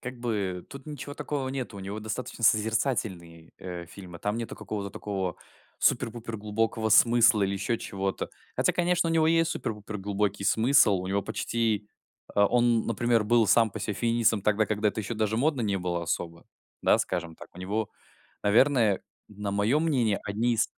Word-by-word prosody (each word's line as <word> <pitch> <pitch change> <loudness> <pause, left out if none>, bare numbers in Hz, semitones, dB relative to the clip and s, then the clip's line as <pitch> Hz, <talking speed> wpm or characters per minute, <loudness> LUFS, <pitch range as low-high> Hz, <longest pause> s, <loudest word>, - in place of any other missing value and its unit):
как 125 0 -7
бы, 100 -7 -2
тут 140 0 -11
ничего 145 -1 -7
такого 140 -3 -3
нету. 130 -5 -5
У - - -7
него 100 +3 -5
достаточно 110 +2 -4
созерцательные, 105 -6 0
э, 90 -2 -7
фильмы, 90 -1 -11
там 105 +5 -2
нету 115 -1 -5
какого-то 100 -1 -5
такого 95 -4 -4 0.4
супер-пупер 115 0 0
глубокого 110 +1 -1
смысла 115 0 +5
или 95 - +1
еще 100 +4 -1
чего-то. 95 0 -3 0.3
Хотя, - - +2
конечно, 175 -1 +1
у - - 0
него 160 -1 +3
есть 165 0 +3
супер-пупер 105 -5 -4
глубокий 100 0 -1
смысл. 115 -2 +4
У 95 - -5
него 100 +1 0
почти 110 -2 -1 0.5
А, 100 0 +5
он, 120 0 +2
например, 115 +1 +2
был 115 +1 +4
сам 115 +1 +4
по - - -6
себе 105 - -2
феминистом 115 -2 +1
тогда, 105 0 +2
когда 105 +1 +1
это 105 - -3
еще 110 +3 -4
даже 110 0 0
модно 140 +2 +1
не 100 -3 0
было 90 -1 -2
особо. 85 0 -4 0.4
Да, - - +4
скажем 85 -2 -3
так. - - -12
У - - -12
него, 100 +4 -2 0.5
наверное, 115 -1 +4 0.3
на 105 -1 -5
мое 105 +8 +2
мнение, 125 -11 +1
одни 115 +4 0
из 110 - +2
110 Hz, 175 wpm, -27 LUFS, 100-120 Hz, 0.5 s, смысла